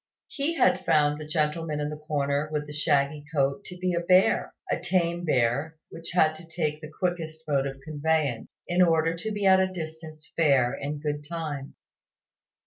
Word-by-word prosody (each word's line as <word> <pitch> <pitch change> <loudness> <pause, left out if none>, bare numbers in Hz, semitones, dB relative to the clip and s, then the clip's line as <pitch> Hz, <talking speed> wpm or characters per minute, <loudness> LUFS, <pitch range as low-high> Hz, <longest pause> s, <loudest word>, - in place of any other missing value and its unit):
He 295 +4 -2
had 185 - +3
found 150 -2 +3
the 150 - -7
gentleman 155 0 -1
in 150 0 -1
the 150 - -5
corner, 150 -1 -1
with 150 -1 -2
the 150 - -9
shaggy 145 -1 +1
coat, 140 -2 +1
to 180 - -9
be 180 0 -1
a 170 - +1
bear 180 +2 +3 0.2
a - - +1
tame 175 -1 0
bear, 140 +3 +1
which 165 0 -8
had 155 -3 +4
to 165 +1 -13
take 155 -2 -2
the 155 - -8
quickest 160 -1 -3
mode 140 -2 +1
of 135 0 -7
conveyance, 150 -4 -1
in 175 +1 +2
order 165 -1 +3
to 215 +6 -4
be 205 -1 -2
at 190 -1 +7
a 190 0 +1
distant 160 -2 -7 0.2
fair 135 -7 +3
in 145 +2 -4
good 150 -1 -2
time. 150 -5 -5
155 Hz, 185 wpm, -27 LUFS, 145-170 Hz, 0.2 s, at